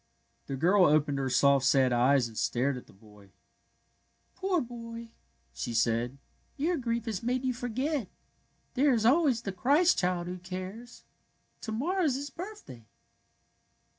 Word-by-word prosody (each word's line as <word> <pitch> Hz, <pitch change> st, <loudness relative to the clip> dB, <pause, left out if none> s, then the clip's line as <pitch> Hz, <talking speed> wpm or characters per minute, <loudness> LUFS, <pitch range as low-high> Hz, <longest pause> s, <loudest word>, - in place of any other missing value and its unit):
The 135 Hz, -, -3 dB
girl 180 Hz, +7 st, +4 dB
opened 145 Hz, -2 st, +2 dB
her 135 Hz, -1 st, -1 dB
soft, 140 Hz, +1 st, +4 dB
sad 135 Hz, -2 st, +3 dB
eyes 125 Hz, +1 st, +3 dB
and 115 Hz, -, -13 dB
stared 130 Hz, +5 st, 0 dB
at 125 Hz, -, -10 dB
the -, -, -17 dB
boy. 105 Hz, 0 st, -18 dB
'^ -, -, -26 dB, 1.0 s
Poor 380 Hz, -2 st, 0 dB
boy! 230 Hz, -2 st, -8 dB, 0.2 s
" -, -, -42 dB
she 120 Hz, -, -4 dB
said. 115 Hz, +3 st, +1 dB, 0.2 s
" -, -, -40 dB
Your 325 Hz, +5 st, 0 dB
grief 235 Hz, -5 st, -2 dB
has 220 Hz, -5 st, -3 dB
made 250 Hz, +2 st, -1 dB
you 255 Hz, -, +1 dB
forget. 250 Hz, +1 st, -2 dB, 0.6 s
There 275 Hz, +1 st, +3 dB
is 225 Hz, -2 st, +1 dB
always 260 Hz, -3 st, +3 dB
the 195 Hz, -, -3 dB
Christ 290 Hz, -, +3 dB
Child 180 Hz, -2 st, 0 dB
who 180 Hz, +1 st, -6 dB
cares. 185 Hz, +6 st, -8 dB, 0.6 s
To 220 Hz, -, -5 dB
morrow 335 Hz, -, -1 dB
is 275 Hz, -5 st, +1 dB
His 280 Hz, +1 st, -5 dB
birthday." 350 Hz, -, -10 dB
215 Hz, 165 wpm, -29 LUFS, -, 1.0 s, girl